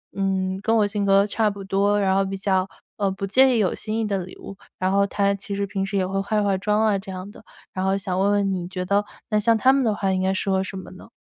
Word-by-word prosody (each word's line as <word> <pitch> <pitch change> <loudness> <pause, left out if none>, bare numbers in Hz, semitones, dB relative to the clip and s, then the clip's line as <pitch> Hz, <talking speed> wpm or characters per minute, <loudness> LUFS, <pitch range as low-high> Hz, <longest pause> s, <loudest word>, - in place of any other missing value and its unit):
嗯， 190 -1 -1
跟 225 +2 +1
我 215 -2 +4
性 205 0 -2
格 195 0 +5
差 215 +1 +1
不 200 -1 -7
多， 200 +2 +1
然 190 -2 +2
后 195 +1 +3
比 195 0 -4
较， 190 -1 0 0.3
嗯， 200 -2 0
不 195 - -3
介 260 +5 +4
意 - - +2
有 195 -4 +1
新 215 +1 -4
意 225 - 0
的 200 -2 -1
礼 185 - -12
物， 195 - -10 0.2
然 185 0 0
后 200 0 +3
她 200 0 +1
其 200 0 -5
实 200 0 -1
平 195 0 -3
时 200 +1 -2
也 190 - +1
会 195 +1 -1
化 210 +1 0
化 200 -1 +1
妆 210 +2 +1
啊 210 -3 +2
这 195 0 -9
样 185 +2 -7
的。 - - -15 0.3
然 185 - -3
后 190 0 +2
想 190 -2 -3
问 200 +1 +3
问 200 -1 +1
你 175 -2 -3
觉 180 0 -4
得， 200 +2 +2 0.3
那 215 -2 +2
像 225 +2 +3
她 260 +4 +4
们 275 -1 +2
的 220 -3 +1
话 195 -2 0
应 185 - 0
该 190 0 +1
适 195 +1 -1
合 190 0 +1
什 190 0 -7
么 190 - -9
呢？ 185 - -13
195 Hz, 315 characters per minute, -23 LUFS, 190-205 Hz, 0.3 s, 格